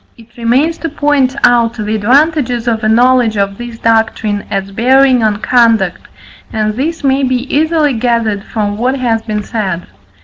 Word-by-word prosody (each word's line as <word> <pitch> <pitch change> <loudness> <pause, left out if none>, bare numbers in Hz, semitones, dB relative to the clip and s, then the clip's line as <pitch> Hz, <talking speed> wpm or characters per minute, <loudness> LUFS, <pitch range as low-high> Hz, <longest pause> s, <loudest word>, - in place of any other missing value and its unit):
It 235 0 -19
remains 255 +8 0
to 330 - -3
point 285 -3 0
out 235 -1 +3
the 215 -1 -3
advantages 250 +2 +1
of 225 -1 -1
a 215 - +1
knowledge 240 -1 +3
of 200 +1 -2
this 240 -1 -7
doctrine 220 -2 0
as 195 0 -3
bearing 255 +4 +3
on 215 -2 +1
conduct, 225 -7 +1 0.4
and 215 -1 -1
this 315 +7 -3
may 270 0 +2
be 255 -1 -1
easily 310 -1 +1
gathered 230 -4 -1
from 210 -2 -3
what 255 +3 0
has 235 -3 0
been 215 -2 -4
said. 195 -6 -3
235 Hz, 165 wpm, -13 LUFS, 215-260 Hz, 0.4 s, out